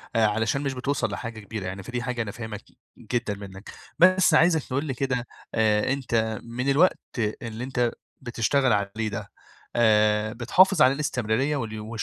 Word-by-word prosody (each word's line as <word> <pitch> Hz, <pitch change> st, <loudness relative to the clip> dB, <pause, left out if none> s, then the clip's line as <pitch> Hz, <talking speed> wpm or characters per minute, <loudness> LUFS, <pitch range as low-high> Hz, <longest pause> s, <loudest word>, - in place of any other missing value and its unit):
علشان 110 Hz, +4 st, +2 dB
مش 140 Hz, -2 st, -2 dB
بتوصل 135 Hz, +1 st, -1 dB
لحاجة 115 Hz, -2 st, -6 dB
كبيرة 105 Hz, -1 st, -6 dB
يعني، 95 Hz, +1 st, -5 dB
فدي 125 Hz, +3 st, -4 dB
حاجة 125 Hz, -2 st, -2 dB
أنا 105 Hz, -3 st, -4 dB
فاهمها 110 Hz, -3 st, -7 dB
ج -, -, -25 dB, 0.4 s
جدًا 120 Hz, -4 st, 0 dB
منك، 100 Hz, 0 st, -10 dB, 0.3 s
بس 185 Hz, -1 st, +5 dB
عايزك 160 Hz, -1 st, +4 dB
تقول 140 Hz, +4 st, -2 dB
لي 135 Hz, -, -2 dB
كده 125 Hz, -2 st, -2 dB, 0.3 s
آآ 110 Hz, +3 st, +2 dB
أنت 115 Hz, -5 st, -1 dB
من 125 Hz, +3 st, -3 dB
الوقت 160 Hz, +7 st, +4 dB, 0.4 s
اللي 115 Hz, 0 st, -6 dB
أنت 125 Hz, -2 st, 0 dB, 0.3 s
بتشتغل 125 Hz, +1 st, +1 dB
عليه 105 Hz, +2 st, -1 dB
ده، 105 Hz, 0 st, -6 dB, 0.5 s
آآ 105 Hz, -1 st, +3 dB
بتحافظ 160 Hz, -, +4 dB
على 130 Hz, -1 st, +6 dB
الاستمرارية 135 Hz, -1 st, -1 dB
وال 110 Hz, -3 st, -5 dB
120 Hz, 160 wpm, -25 LUFS, 110-135 Hz, 0.5 s, على